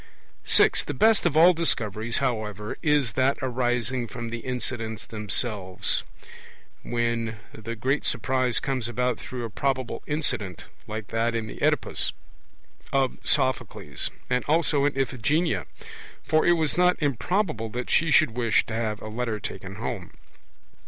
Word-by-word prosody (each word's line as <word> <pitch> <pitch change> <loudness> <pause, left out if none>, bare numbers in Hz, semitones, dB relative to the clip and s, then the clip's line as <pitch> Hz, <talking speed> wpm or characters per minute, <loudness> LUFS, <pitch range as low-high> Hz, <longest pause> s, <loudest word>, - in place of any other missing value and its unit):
(6) - - +6
The - - -4
best 220 +3 +4
of 155 -2 0
all 175 +3 +8
Discoveries, 115 - 0
however, 110 -5 -2
is 150 -6 +2
that 130 +4 +2
arising 125 -1 -1
from 115 +1 -6
the 120 - -4
incidents 115 -2 -3
themselves, 105 -2 0 0.8
when 115 -2 -1 0.2
the 115 +1 -6
great 135 +6 0
surprise 130 -2 +1
comes 130 -4 -2
about 125 +1 -1
through 125 -2 -5
a - - -5
probable 130 0 -2
incident, 125 - -2 0.2
like 110 -1 -6
that 115 +1 0
in 115 -1 -1
the - - -9
Oedipus - - +1 0.8
of 135 -2 +1
Sophocles; 130 -5 +1 0.2
and 125 0 0
also 150 -2 +2
in 145 -1 0
Iphigenia; 145 +6 0 0.6
for 155 0 +2
it 175 - +6
was 160 0 0
not 180 0 +4
improbable 145 - -1
that 125 +3 -4
she 165 +1 +3
should 145 - +5
wish 115 -1 +2
to 110 - -7
have 110 -1 -2
a - - -6
letter 110 0 -3
taken - - -6
home. - - -5
125 Hz, 145 wpm, -26 LUFS, 115-140 Hz, 0.8 s, all